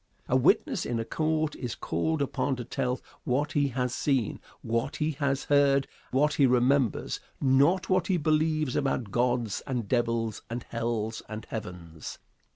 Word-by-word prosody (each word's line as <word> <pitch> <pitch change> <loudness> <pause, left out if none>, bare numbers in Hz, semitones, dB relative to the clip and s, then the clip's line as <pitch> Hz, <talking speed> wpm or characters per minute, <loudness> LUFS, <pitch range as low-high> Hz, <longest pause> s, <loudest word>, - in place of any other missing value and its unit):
A - - +1
witness - - +3
in 120 -1 -2
a 115 - -2
court 155 +1 0
is 120 -3 -4
called 160 -2 -1
upon 135 0 -1
to 125 - -5
tell 125 +1 -1 0.2
what 145 +4 0
he 145 -1 +2
has 125 -1 -1
seen, 135 -7 0 0.2
what 115 +5 -1
he 155 0 0
has 140 -2 -1
heard, 140 -1 +3 0.2
what 150 +3 +2
he 140 - +4
remembers, 125 +1 +2 0.2
not 145 +8 +3
what 185 -2 +2
he 190 - +2
believes 155 -2 +1
about 130 -6 0
gods 120 -3 0
and 125 -5 -2
devils 115 -2 0
and 120 +1 -4
hells 115 -1 -2
and 110 0 -6
heavens. 90 -7 -7
130 Hz, 160 wpm, -28 LUFS, 115-145 Hz, 0.2 s, he